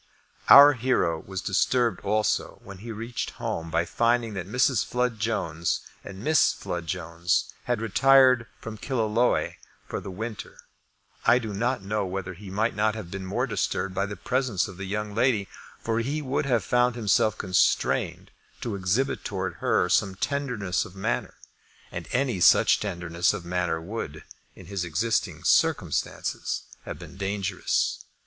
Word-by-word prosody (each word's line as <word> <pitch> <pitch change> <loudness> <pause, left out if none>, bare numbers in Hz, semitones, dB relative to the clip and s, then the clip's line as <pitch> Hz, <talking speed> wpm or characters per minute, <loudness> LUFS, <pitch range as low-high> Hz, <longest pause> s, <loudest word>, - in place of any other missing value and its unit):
Our 145 +1 +10
hero 120 - +1
was 95 0 -6
disturbed 120 +4 +1
also 105 +1 0
when 100 -1 -10
he 115 +3 -7
reached 115 +2 -4
home 80 0 -3
by 85 - +1
finding 115 +3 +1
that 90 -2 -5
Mrs. 125 +1 +2
Flood 125 -2 -1
Jones 85 -7 -1 0.2
and 95 +2 -9
Miss 155 +1 +4
Flood 85 -1 -5
Jones 85 0 -1
had 120 -2 -1
retired 130 +2 +5
from 110 -1 -8
Killaloe 120 -2 +1 0.3
for - - -4
the - - -8
winter. 110 +3 -6 0.7
I 120 - +5
do 110 -4 -4
not 120 +2 -1
know 105 +1 -1
whether 90 0 -4
he 95 +2 -11
might 110 +5 0
not 110 0 +1
have 95 -6 -7
been 95 -1 -5
more 120 +7 0
disturbed 95 -4 -2
by 100 +2 -1
the 100 - -6
presence 125 -6 0
of 95 - -10
the 95 - -5
young 105 +2 -3
lady, 115 -3 +2 0.3
for 115 0 -1
he 140 +6 -1
would 140 0 -2
have 120 -6 +2
found 125 +6 +2
himself 110 -1 +2
constrained 90 -1 +1 0.3
to 115 - -3
exhibit 100 +8 0
towards 95 -4 -3
her - - +2
some 95 -2 +2
tenderness 110 -4 -1
of 90 - -12
manner; 80 -11 -2 0.6
and - - -6
any 125 -6 0
such 85 - +5
tenderness 85 -4 0
of 85 - -7
manner 85 -2 -1
would, 80 -4 -6 0.3
in 95 - -13
his 100 0 -3
existing 95 +7 -1
circumstances, - - 0 0.2
have - - -6
been 85 +4 -11
dangerous. 100 -1 -1
105 Hz, 155 wpm, -26 LUFS, 95-120 Hz, 0.7 s, Our